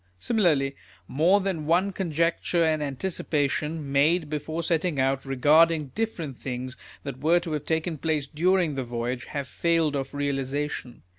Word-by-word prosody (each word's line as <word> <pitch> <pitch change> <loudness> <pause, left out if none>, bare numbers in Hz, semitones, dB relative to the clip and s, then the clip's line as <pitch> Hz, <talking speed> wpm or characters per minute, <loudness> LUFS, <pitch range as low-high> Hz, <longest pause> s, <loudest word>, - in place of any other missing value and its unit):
Similarly, 150 - +1 0.3
more 175 +8 +3
than 175 -6 -2
one 180 +4 +3
conjecture 170 -1 0
and 155 -1 +1
anticipation, 150 0 -2
made 150 +3 +2
before 155 +2 -3
setting 165 -2 0
out, 135 +1 +1
regarding 150 +2 +3
different 170 - -3
things 125 0 -5 0.3
that 140 -2 -6
were 165 +4 +4
*to 170 - -6
have 150 -1 -3
taken 160 -1 -1
place 155 -2 0
during 175 +3 +1
the 135 -1 -2
voyage, 120 +1 -3
have 140 -2 -4
failed 165 -1 +1
of 135 0 -4
realisation. 140 -2 -3
150 Hz, 145 wpm, -26 LUFS, 135-165 Hz, 0.3 s, were